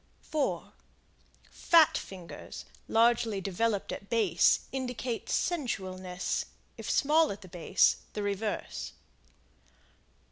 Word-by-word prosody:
4 305 -2 -2 0.8
Fat 330 -2 +5
fingers, 180 -3 -7 0.2
largely 230 -2 +3
developed 200 +2 -1
at 200 - -7
base, 205 -8 +3
indicate 250 -3 -3
sensualness; 185 - -2 0.3
if - - -7
small 310 +2 +4
at 195 -3 -9
base, 175 -3 +3 0.2
the 210 - -3
reverse. 205 +1 -3
220 Hz, 85 wpm, -30 LUFS, 190-250 Hz, 0.8 s, Fat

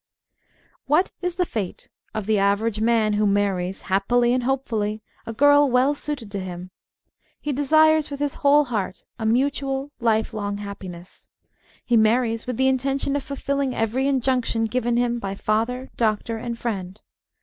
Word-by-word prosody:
WHAT 305 +7 +3
is 360 -1 -2
the 360 - +1
fate 210 - -5 0.3
of 215 -2 -2
the 215 -1 +2
average 205 +2 +1
man 225 -2 +2
who 210 0 +2
marries, 195 -2 0
happily 240 +6 +2
and 255 - +1
hopefully, 225 -5 -1 0.2
a - - -3
girl 285 +4 +5
well 255 +3 +3
suited 285 -7 -4
to 200 - -3
him? 180 -1 -7 0.7
He 295 - -3
desires 310 +2 +4
with 280 -1 -6
his 290 -1 -1
whole 290 +1 +5
heart 205 -7 -3 0.2
a 220 - -1
mutual, 270 +3 0
life 225 -2 +1
long 205 -1 -3
happiness. 190 -3 -9 0.6
He 240 - +3
marries 225 +1 +2
with 250 -3 -3
the 265 - +3
intention 270 +1 0
of 285 - 0
fulfilling 280 -1 -2
every 235 +5 0
injunction 255 -4 +1
given 240 +1 0
him 240 0 +1
by 195 -2 -4
father, 230 +6 -1
doctor, 225 0 0
and 235 +1 -5
friend. 195 -5 -4
235 Hz, 160 wpm, -23 LUFS, 210-270 Hz, 0.7 s, girl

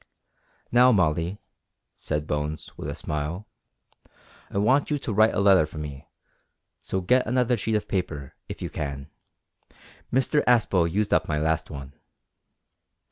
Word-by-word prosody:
"Now, 125 +2 +6
Molly," 85 -2 +1 0.6
said 75 0 -3
Bones, 75 +1 -4
with - - -6
a - - -4
smile, 75 +7 -4 1.0
"I - - -5
want 130 +8 +3
you 150 - +1
to 125 -5 -4
write 110 +2 +4
a - - +1
letter 95 -5 +5
for 75 - -11
me, 75 0 -7 0.7
so 95 - -2
get 125 +8 +2
another 125 +1 +2
sheet 110 0 -1
of 105 - -1
paper, 75 -8 -3 0.2
if - - -6
you - - -4
can; 70 -1 -5 1.0
Mr 135 +3 +2
Aspel 100 -8 +3
used 105 +3 0
up - - +2
my 75 - 0
last 80 +1 0
one." 70 -2 -8
90 Hz, 145 wpm, -25 LUFS, 75-110 Hz, 1.0 s, Now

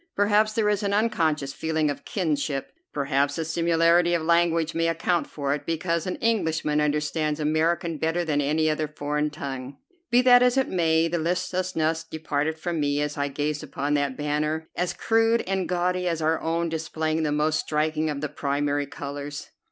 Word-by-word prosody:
Perhaps 210 +1 +3
there 215 -1 +1
is 210 0 +1
an 200 -1 0
unconscious 160 -11 +1
feeling 160 -1 0
of - - -8
kinship; 150 -7 -2 0.2
perhaps 140 0 0
the 165 - -2
similarity 170 +1 +3
of 165 - -1
language 170 -1 +2
may 165 0 +1
account 165 +1 0
for 140 -2 -2
it, 150 - -4
because 165 +1 -1
an 185 - -2
Englishman 160 -9 0
understands 150 +1 0
American 160 +1 0
better 165 +2 0
than 145 -2 +1
any 155 +3 +1
other 155 0 0
foreign 150 0 -2
tongue. 140 -3 -6 0.3
Be 245 +1 +4
that 245 -1 +7
as 250 +1 +3
it 265 - +2
may, 165 -2 +2
the 170 +1 -1
listlessness 170 -1 -1
departed 155 0 -2
from 170 0 -3
me 145 -1 +1
as 150 0 -2
I 140 -1 -1
gazed 150 +1 -2
upon 145 -1 -3
that 140 -2 0
banner, 150 +2 -1
as 180 0 -1
crude 225 +1 +2
and 190 -1 -1
gaudy 180 0 0
as 165 -2 0
our 160 0 +1
own, 165 +1 0
displaying 160 0 -2
the 150 -2 0
most 150 +1 +1
striking 155 +1 0
of 145 -2 -3
the 150 - -2
primary 145 0 -1
colors. 145 +1 -7
160 Hz, 180 wpm, -25 LUFS, 150-170 Hz, 0.3 s, that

